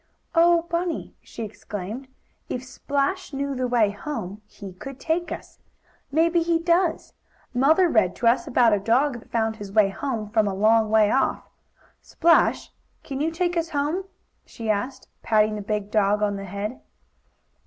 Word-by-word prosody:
"Oh, 340 0 +5
Bunny!" 340 0 -3
she 230 - -8
exclaimed, 210 +3 -7 0.4
"if 250 - -3
Splash 280 +7 -2
knew 280 0 -2
the 255 -1 -1
way 235 -4 +3
home 205 -3 -6
he 200 -3 -10
could 265 +8 -9
take 340 +2 -1
us. - - -8 0.5
Maybe 335 +3 +3
he 335 0 +2
does. 335 0 +1 0.4
Mother 310 +9 +4
read 215 - +2
to - - -4
us 235 - +3
about 240 -3 +4
a 205 - +2
dog 240 +5 +1
that - - -19
found 220 -1 0
his 205 -2 -8
way 205 -1 +4
home 225 0 -3
from 215 -1 +2
a 195 - -2
long 220 +2 +3
way 215 -1 +4
off. 270 - +1 0.6
Splash, 335 0 +2 0.3
can 275 -1 -5
you 315 - +1
take 350 +2 -1
us 335 -1 -1
home?" 305 +5 -1 0.4
she 225 -2 -3
asked, 255 +6 -3
patting 215 -1 +2
the 210 - -4
big 210 0 -3
dog 210 -1 +2
on 205 -1 +1
the 195 0 -6
head. 200 +5 -5
245 Hz, 165 wpm, -24 LUFS, 210-320 Hz, 0.6 s, Oh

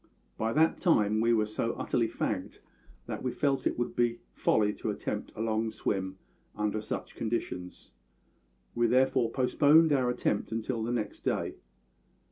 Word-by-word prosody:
By 110 0 -1
that 160 +2 +3
time 110 - +3
we 115 +1 +3
were 110 -2 +3
so 110 +2 -2
utterly 115 -2 0
fagged - - -3 0.5
that - - -5
we 130 - -1
felt 140 0 0
it - - -2
would 120 - -2
be 120 -1 +2 0.2
folly 105 - +2
to - - -4
attempt - - -4
a - - -5
long 110 0 0
swim 95 -3 -2 0.4
under 105 0 -1
such 105 - -5
conditions; 100 -6 -4 0.8
we 120 0 +2
therefore 130 0 +3
postponed 145 +5 +4
our 130 -3 +2
attempt 120 -4 -1
until 115 +1 -2
the 115 +2 -2
next 110 -4 -2
day. - - -1
115 Hz, 155 wpm, -30 LUFS, 110-130 Hz, 0.8 s, postponed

